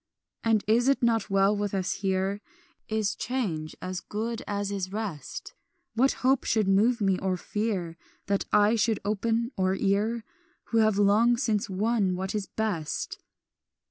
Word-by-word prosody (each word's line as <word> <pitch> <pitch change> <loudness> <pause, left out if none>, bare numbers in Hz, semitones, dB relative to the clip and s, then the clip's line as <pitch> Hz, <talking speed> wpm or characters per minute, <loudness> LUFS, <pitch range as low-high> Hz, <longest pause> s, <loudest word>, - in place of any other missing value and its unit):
"And 225 -2 +2
is 235 +4 +3
it 275 -2 +2
not 225 -3 +2
well 195 +1 +3
with 205 -1 -2
us 185 -2 0
here? 195 +1 0 0.5
Is 215 -2 0
change 185 -12 -3
as 185 0 -3
good 225 +5 -4
as 205 0 -2
is 190 -2 -3
rest? 195 -10 -5 0.4
What 255 +5 +3
hope 265 0 +4
should 215 -3 +1
move 220 +5 +3
me, 195 -2 +2
or 190 -1 -1
fear, 190 -5 -3 0.3
That 200 0 0
eye 210 +2 +4
should 220 0 +1
open 225 +3 0
or 190 0 +1
ear, 210 +4 0 0.5
Who 230 - +2
have 215 -2 +3
long 215 +4 +4
since 220 -5 0
won 200 -1 +1
what 190 +1 -3
is 210 -2 -2
best? 190 -9 -3
205 Hz, 155 wpm, -27 LUFS, 195-225 Hz, 0.5 s, hope